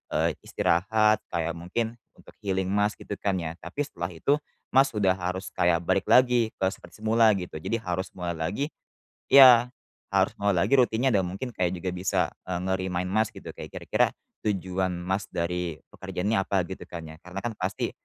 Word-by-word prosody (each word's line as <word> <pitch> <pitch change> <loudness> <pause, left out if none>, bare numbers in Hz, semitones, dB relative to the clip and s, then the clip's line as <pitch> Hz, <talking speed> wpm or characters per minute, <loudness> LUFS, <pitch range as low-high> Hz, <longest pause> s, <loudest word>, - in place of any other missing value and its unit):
eee, - - +2
istirahat, 105 +4 +2
kayak 85 0 0
mungkin 110 +7 -3 0.2
untuk - - -17
healing 95 -2 -1
Mas, 105 +1 +1
gitu - - -7
kan 100 -2 0
ya. 80 -1 -4
Tapi 145 - -5
setelah 90 -11 -5
itu, 140 - +2 0.4
Mas 135 +1 +6
udah 95 -3 +3
harus 90 +2 -3
kayak 85 -1 +2
balik - - +1
lagi 125 -3 +5
ke 95 - -1
seperti 90 +5 -15
semula 110 0 +5
gitu. 90 -3 -6
Jadi 115 - -1
harus 90 -1 -3
mulai 90 -1 -3
lagi 95 - -1 0.7
iya, 125 -3 +9 0.4
harus - - +3
mau 100 - +2
lagi 85 +10 +2
rutinnya 125 +1 +3
dan 95 -2 +3
mungkin 100 +8 -5
kayak 90 0 0
juga 90 +1 -3
bisa, 90 +1 0 0.3
e - - -2
nge-remind 95 -1 -1
Mas 110 +2 +2
gitu, - - -9
kayak - - -9
kira-kira - - +2 0.4
tujuan 95 -2 0
Mas 95 +2 -1
dari 85 -1 -2
pekerjaannya 100 +4 -2
apa, 95 -1 +1
gitu 95 - -7
kan 85 -1 -7
ya. 80 - -10
Karena 90 +2 -6
kan 120 - -1
pasti, 95 +1 -2
95 Hz, 180 wpm, -27 LUFS, 90-110 Hz, 0.7 s, iya